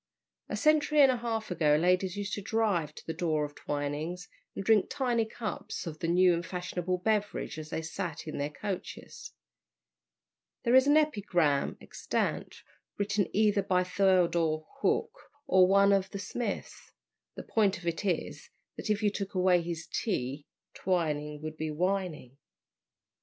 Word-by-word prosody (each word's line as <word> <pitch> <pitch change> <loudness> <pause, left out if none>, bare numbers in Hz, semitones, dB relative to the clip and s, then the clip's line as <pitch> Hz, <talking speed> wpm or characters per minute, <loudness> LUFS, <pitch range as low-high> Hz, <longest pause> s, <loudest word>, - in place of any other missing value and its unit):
A - - -2
century 305 -1 +3
and 270 -2 +7
a 250 - -1
half 225 -3 -3
ago 150 -4 +3
ladies 180 +4 +2
used 200 -1 -3
to 205 - -2
drive 195 -8 0
to - - -11
the 160 - -3
door 160 -3 0
of 145 - -9
Twining's 145 +6 -4 0.3
and 195 - -5
drink 220 -3 +4
tiny 240 -4 0
cups 220 -4 -5
of 155 -2 -6
the 165 - -2
new 180 +1 +5
and 170 0 -1
fashionable 180 +1 -3
beverage 210 -4 -1
as 155 0 -8
they 160 - -3
sat 160 0 -5
in 155 - -5
their 145 +1 -1
coaches. 190 +4 -7 1.3
There 235 - +2
is 260 +1 +6
an 290 +1 +6
epigram 190 - +1
extant, - - -3 0.3
written 200 -1 0
either 210 -1 +3
by 185 -1 +1
Theodore 175 -4 +2
Hook 460 - +1 0.3
or 185 -1 +5
one 200 +1 +5
of 190 -1 +1
the 200 - -6
Smiths; 235 +4 -5 0.4
the - - -7
point 205 -4 +1
of 175 - -12
it 170 +3 -2
is, 185 -5 -2 0.3
that - - -5
if 210 0 +1
you 205 - +3
took 195 -1 -5
away 180 -1 +4
his 165 -1 -5
T, 145 - -3 0.3
Twining 150 -5 -1
would 155 0 -6
be 155 0 -3
Wining. 165 -5 -2
180 Hz, 160 wpm, -30 LUFS, 160-205 Hz, 1.3 s, and